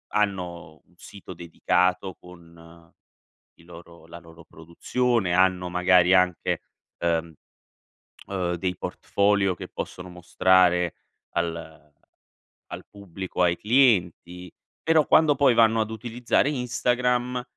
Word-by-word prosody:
hanno 90 -6 -3
un 90 - -30
sito 95 +1 -12
dedicato 90 +2 -1
con 85 -1 -17 0.6
i - - -22
loro 85 0 -15
la 85 +1 -11
loro 80 0 -16
produzione, 95 +5 -2
hanno 90 0 +2
magari 90 0 +3
anche, 90 -2 +1 0.4
ehm, 85 -1 -1 0.9
uhm, 90 -3 -2
dei 90 +1 -3
portfolio 100 -2 0
che - - -9
possono 90 0 -7
mostrare 90 0 +2 0.4
al 80 -2 -5 0.8
al - - -10
pubblico, 95 -2 -6
ai 85 -1 +2
clienti. 90 -7 +1 0.3
Però, 160 -2 +2
quando 155 -2 +4
poi 135 -4 +3
vanno 115 -1 +3
ad 110 - -2
utilizzare 120 +4 -1
Instagram, 125 -1 -1
90 Hz, 110 wpm, -24 LUFS, 85-110 Hz, 0.9 s, quando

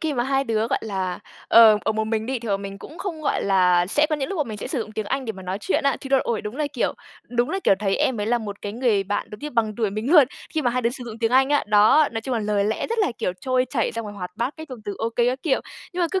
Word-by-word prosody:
khi 315 -2 -1
mà 240 0 0
hai 270 0 +1
đứa, 225 -2 0
gọi - - 0
là, 190 -4 -3 0.3
ờ, 220 -2 +8
ở 220 - +1
một 220 0 -1
mình 220 0 -2
đi 260 -1 -1
thì 230 -1 -7
bọn 200 0 0
mình 195 0 -7
cũng 315 - -11
không, 335 -6 -4
gọi - - 0
là, 180 -2 +4
sẽ 295 +10 +3
có 305 - +1
những 270 -2 -3
lúc 320 -9 -1
mình 215 -2 -6
sẽ - - -5
sử 275 - -2
dụng 215 -1 -6
tiếng 215 -1 -4
Anh 270 +4 -2
để 220 - -3
mà 190 -1 -11
nói 185 +2 -3
chuyện 190 +9 0
á, 275 -3 +2
thì 270 - -7
đo 270 0 +4
ôi, 230 -3 -2
đúng 210 +5 -6
là, 300 -1 0
kiểu 250 - 0 0.4
đúng 240 0 0
là, 385 - -1
kiểu, - - +5
thấy 195 -2 0
em 260 -7 0
ấy 205 - -1
là 240 +1 +2
một 205 -2 -7
cái 205 - -4
người 225 -4 +1
bạn 205 +1 -2
giống 210 - -8
như 300 - -5
bằng 220 -4 0
tuổi 220 -4 0
mình 215 +7 -3
luôn, 300 -6 +9 0.3
khi 310 - +1
mà 245 - +2
hai 250 0 -1
đứa 235 - +2
sử 250 -1 -7
dụng 225 -1 -8
tiếng 225 0 +1
Anh 265 +1 +5
á, 290 - +2
đó, 215 +9 +5
nói 225 - -2
chung 255 +2 -3
là 225 - 0
lời 205 -1 0
lẽ 215 +2 -1
rất 460 0 -3
là, 400 - +2
kiểu, 180 - -1
trôi 255 -1 +1
chảy 235 -5 0
xong 230 -1 -4
rồi 205 - -8
hoạt 180 -3 -6
bát 245 +5 -2
cái 315 0 -8
dùng 255 - -8
từ 205 - -4
ô 225 - 0
kê 235 +1 +1
các 255 +2 -3
kiểu. 290 -5 +1 0.3
Nhưng 360 - -3
mà - - +3
cứ 380 - 0
230 Hz, 335 wpm, -23 LUFS, 210-270 Hz, 0.4 s, luôn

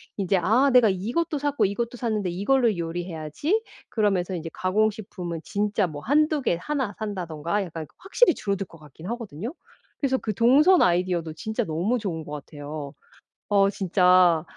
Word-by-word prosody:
이제 195 -1 +1
‘아 240 +10 +4
내가 245 -3 +6
이것도 245 - -1
샀고 290 0 +1
이것도 235 +5 -2
샀는데 215 -6 -1
이걸로 220 +5 +2
요리해야지.‘ 170 - -2 0.3
그러면서 195 -4 0
이제 165 -1 -5
가공식품은 195 -3 -1
진짜 205 -1 0
뭐 150 -4 -6
1-2 300 - +2
개 175 -9 +1
1 265 -8 -2
산다던가 180 -3 -3
약간 165 -2 -7
그 - - -27
확실히 385 0 +3
줄어들 200 -2 -2
것 165 - -15
같긴 155 +3 -12
하거든요. 230 - -5 0.4
그래서 265 -2 +1
그 215 -4 -3
동선 285 - +5
아이디어도 175 -2 +1
진짜 220 +8 -3
너무 185 +10 0
좋은 170 -7 -4
것 145 - -10
같아요. 145 0 -7 0.5
어 200 -1 +4
진짜 180 -4 +4
200 Hz, 340 characters per minute, -25 LUFS, 170-235 Hz, 0.5 s, 내가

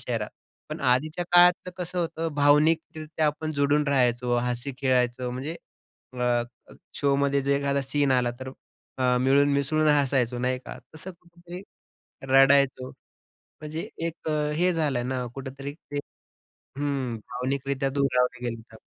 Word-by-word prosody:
शहरात. - - -3 0.4
पण - - -6
आधीच्या 155 +8 +1
काळातलं 180 +1 +5
कसं 180 0 -4
होतं, 165 -1 -2
भावनिकरित्या 155 +2 +2
आपण 155 +1 -2
जोडून 145 +1 +2
राहायचो, 125 -2 +2
हसी 125 +2 -2
खेळायचो, 125 -2 +1
म्हणजे 135 +6 -4 0.7
अ, 120 -1 +2 0.5
शोमध्ये 140 0 +1
जर 140 - -1
एखादा 140 0 0
सीन 140 +1 0
आला 125 -1 +2
तर, 130 0 -6 0.5
अ, 125 -1 +2
मिळून 140 +2 +4
मिसळून 155 +2 +1
हसायचो 135 -4 +2
नाही 125 +1 0
का. - - -10 0.2
तसं 180 +5 -8
कुठेतरी 175 +1 -11 0.7
रडायचो. 135 -1 +4 0.5
म्हणजे 155 +2 -8 0.2
एक 165 -1 -8
अ, 150 -1 0
हे 180 +2 +2
झालाय 145 -7 0
ना 125 0 -2
कुठेतरी 135 +1 -7
ते 145 -2 -7 0.8
हं 140 -4 -2
भावनिकरित्या 135 +4 -3
दुरावले 125 -3 0
गेलोत 115 -1 -6
आपण. 110 - -13
140 Hz, 135 wpm, -26 LUFS, 125-155 Hz, 0.8 s, काळातलं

